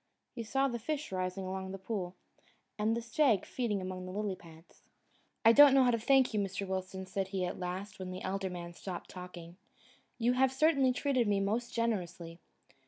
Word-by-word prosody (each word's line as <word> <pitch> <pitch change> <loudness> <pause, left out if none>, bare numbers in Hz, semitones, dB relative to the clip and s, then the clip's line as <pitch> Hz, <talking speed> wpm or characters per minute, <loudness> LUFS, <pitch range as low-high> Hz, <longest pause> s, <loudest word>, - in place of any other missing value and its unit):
He 235 - -5
saw 270 +5 +1
the 240 -3 -3
fish 300 +3 -3
rising 185 +1 -2
along 190 0 -4
the - - -4
pool, 190 -2 -4 0.6
and 220 +2 +1
a 235 - -4
stag 235 -3 +2
feeding 210 -6 -2
among 185 0 -5
the - - -6
lily 205 0 -2
pads. 165 -1 -17 0.6
"I 225 - +10
don't 285 +1 +9
know 270 - +6
how 250 - +4
to 230 - +1
thank 265 +1 +4
you, 210 - +1
Mr. 195 0 -2
Wilson," 190 0 -4
said 190 0 -2
he 190 -1 -2
at 180 - -4
last, 185 +3 -5
when 185 -1 -5
the 185 0 -6
elder 190 0 -2
man 175 -1 -7
stopped 180 0 -7
talking. 180 -1 -9 0.6
"You 240 +1 +2
have 260 +1 +3
certainly 275 -1 +3
treated 255 -2 +1
me 200 -1 +2
most 220 +5 -1
generously. 180 -7 -2
195 Hz, 195 wpm, -32 LUFS, 185-240 Hz, 0.6 s, I